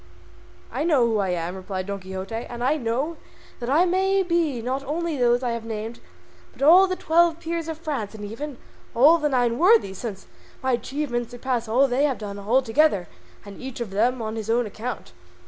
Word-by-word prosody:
"I - - -2
know 300 -7 +3
who 225 -2 +1
I 195 -2 0
am," 175 0 -2
replied 185 0 -5
Don 200 0 -4
Quixote, 190 +2 -7
"and 235 +1 -5
I 275 +4 +3
know 275 +5 -2 0.4
that 240 0 -4
I 315 +6 +4
may 385 +2 +2
be 335 -7 0
not 260 +4 -2
only 325 +3 -2
those 245 -1 +2
I 245 - 0
have 230 -1 -4
named, 225 +1 -5 0.5
but 270 - -6
all 360 +6 +8
the 370 - -1
Twelve 335 -1 +3
Peers 335 -1 -3
of 320 -1 -4
France 280 -11 -4
and 210 -1 -7
even 255 +6 -6 0.4
all 300 +8 +6
the 300 -1 +1
Nine 245 -2 +1
Worthies, 355 - +4
since 205 -5 -6 0.4
my 260 - +1
achievements 240 -1 -2
surpass 245 -1 -2
all 235 +4 +2
that 275 -2 +4
they 280 +3 +3
have 275 -4 0
done 205 -1 -6
all 235 +7 +2
together 225 - +2 0.4
and 200 -1 -10
each 260 -2 -7
of 235 -5 -4
them 235 +4 +1
on 220 +1 -4
his 220 -1 -5
own 240 +1 +2
account." 225 +4 -6
245 Hz, 205 wpm, -24 LUFS, 220-300 Hz, 0.5 s, all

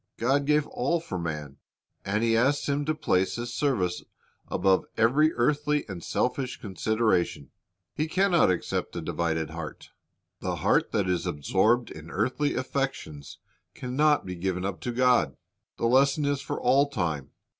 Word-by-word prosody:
God 135 +4 +1
gave 150 0 +3
all 145 +7 -1
for 95 - -5
man, 75 -4 -5 0.5
and 105 +3 -1
He 115 -1 +3
asks 135 +5 +2
him 145 0 0
to 155 +1 0
place 95 -11 +1
His 120 0 -5
service 105 -13 0 0.5
above 95 0 +2
every 145 +8 +4
earthly 150 +3 +1
and 90 -5 -7
selfish 125 +1 -1
consideration. 105 - 0 0.4
He 155 - -1
can 190 +4 +2
not 170 - +5
accept 90 - -2
a - - -3
divided 80 -2 -2
heart. 80 -1 -8 0.5
The - - -2
heart - - +1
that 100 -3 0
is 90 -1 0
absorbed 105 - +1
in 80 +1 -10
earthly 130 - 0
affections 130 - -4 0.4
can 125 0 -5
not 150 +1 +3
be 90 - -5
given 90 +1 -2
up 100 -2 -4
to 125 - -3
God. 125 - +3
V - - -32 0.4
The - - -1
lesson 135 +4 +3
is 140 -1 0
for - - -4
all 135 +3 +3
time. 80 - -2
120 Hz, 165 wpm, -27 LUFS, 90-140 Hz, 0.5 s, not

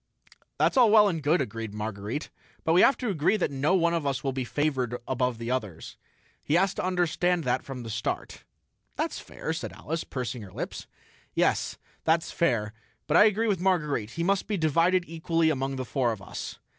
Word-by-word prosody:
"That's - - +2
well 220 -4 +7
and 165 -5 -1
good," 150 +4 +3
agreed 115 -5 -5
Marguerite, 105 +5 -4 0.3
"but 160 - +2
we 180 - +6
have 270 - +5
to 245 - -2
agree 185 +3 +2
that 175 - 0
no 140 +7 +2
one 170 -2 +3
of 165 -2 0
us 140 -2 -1
will 135 - 0
be 130 0 -2
favored 130 -3 -1
above 125 -2 0
the 115 +1 -4
others. 105 -10 -4 0.5
He 150 - 0
has 190 +2 +3
to - - -4
understand 180 -1 +1
that 125 -2 +1
from 130 -3 -7
the 115 - -7
start." 110 0 -4 0.5
"That's - - -2
fair," - - -5
said - - -5
Alice, 165 +2 -4
pursing 125 -2 -4
her 100 -3 -10
lips. - - -6 0.5
"Yes, - - +1 0.3
that's 165 +1 +2
fair. 115 -10 0 0.3
But 150 - 0
I 210 - +8
agree 220 +2 +2
with 195 -5 0
Marguerite: 150 - +1
he 170 - 0
must 195 +2 +1
be 210 - -1
divided 170 +3 +2
equally 165 0 +1
among 135 -1 -2
the 130 -1 -4
four 120 0 0
of 110 - -5
us." 95 - -7
150 Hz, 195 wpm, -27 LUFS, 125-175 Hz, 0.5 s, I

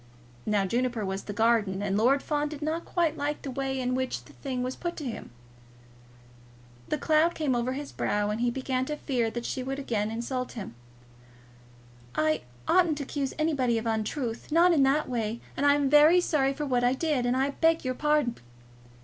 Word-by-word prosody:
Now 205 -2 +2
Juniper 235 +1 -1
was 190 0 -4
the - - -5
gardener, 205 -2 +1
and 195 -1 0
Lord 255 +6 +3
Fawn 295 -1 -1
did 300 -1 -7
not 320 +2 -2
quite 335 -3 0
like 295 +1 -2
the 275 - -4
way 265 0 -2
in 250 0 -1
which 260 0 -2
the - - -16
thing 255 -3 -4
was 255 +1 -3
put 345 -1 -4
to 300 - -5
him. 240 - -6 1.6
The - - -1
cloud 315 +3 +3
came 295 -5 0
across 245 +2 -1
his 285 +1 -6
brow, 205 0 0
and 215 +2 -3
he 245 - +2
began 260 +1 -1
to 300 - -3
fear 250 -6 -1
that 240 +1 -5
she 260 - -3
would 270 +2 -3
again 220 -6 -1
insult 245 +3 -3
him. 205 - -7 1.4
"I 155 0 +1 0.3
oughtn't 345 -5 +3
to 290 - -3
accuse 275 -1 -3
anybody 280 -7 +1
of 225 - -3
an 225 -1 +1
untruth, 230 +3 -4
not 340 +3 +5
in 300 - +3
that 275 +3 +3
way; 230 -2 -2 0.2
and 285 - +1
I 285 - +6
am 290 -1 +1
very 300 +5 +7
sorry 275 -6 +1
for 300 - -3
what 250 -3 +1
I 245 +1 +4
did, 265 -3 0
and 250 +1 +1
I 270 +2 +1
beg 325 +1 +2
your 255 - 0
pardon." 295 -3 +1
260 Hz, 205 wpm, -28 LUFS, 235-295 Hz, 1.6 s, very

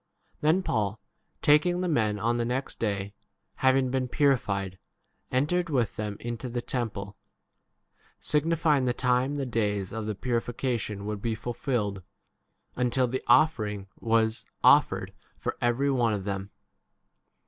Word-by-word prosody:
28 - - -41
Then 190 - -1
Paul 105 - -1 0.4
taking 155 +5 +4
the 180 - 0
men, 110 -10 +1
on 115 +3 0
the 120 - 0
next 125 +3 -3
day, 100 -2 -2 0.4
having 130 -1 +3
been 130 -1 0
purified, 100 - +1 0.5
entered 165 +7 +1
with 125 -7 0
them 105 -1 -4
into 120 +1 -5
the 120 +1 -2
temple, 105 -5 -4 1.0
signifying 150 -2 +2
the 120 -1 +1
time 125 +2 +1
the 140 -2 -2
days 105 -5 -1
of 110 -1 -4
the 105 - -2
purification 115 -2 -2
would 105 -1 -4
be 115 0 -1
f 110 +1 -9
ulfilled, 115 -5 -2 0.7
until 125 +1 +2
the 130 +2 -2
offering 105 -10 +3
was 115 0 +1 0.2
offered - - +4 0.2
for - - -3
every 120 +4 +2
2? - - +2
one 120 -4 +2
of 100 - -4
them. 100 0 -4
120 Hz, 145 wpm, -28 LUFS, 105-130 Hz, 1.0 s, taking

